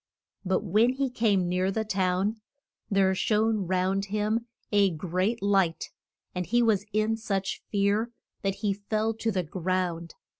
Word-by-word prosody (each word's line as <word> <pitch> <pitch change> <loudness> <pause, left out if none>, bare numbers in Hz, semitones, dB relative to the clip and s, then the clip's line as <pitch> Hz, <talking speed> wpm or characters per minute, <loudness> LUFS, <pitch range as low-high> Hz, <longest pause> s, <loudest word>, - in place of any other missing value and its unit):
But 190 0 +1
when 215 +6 +3
he 270 -1 -1
came 205 -7 +2
near 180 +1 +1
the 220 +3 -1
town 195 +2 0 0.5
there 195 -2 +3
shone 215 0 +1
round 190 +2 +1
him 215 +3 -1 0.2
a 200 -2 +4
great 185 +7 -1
light, 195 -5 +1 0.4
and 180 -1 -3
he 240 +1 +3
was 210 -3 +2
in 215 +1 +1
such 195 -4 -2
fear 205 +3 +1 0.3
that 195 -1 -1
he 200 - +3
fell 215 +2 -1
to 225 +1 -2
the 185 -3 0
ground. 175 0 -2
200 Hz, 150 wpm, -27 LUFS, 185-220 Hz, 0.5 s, a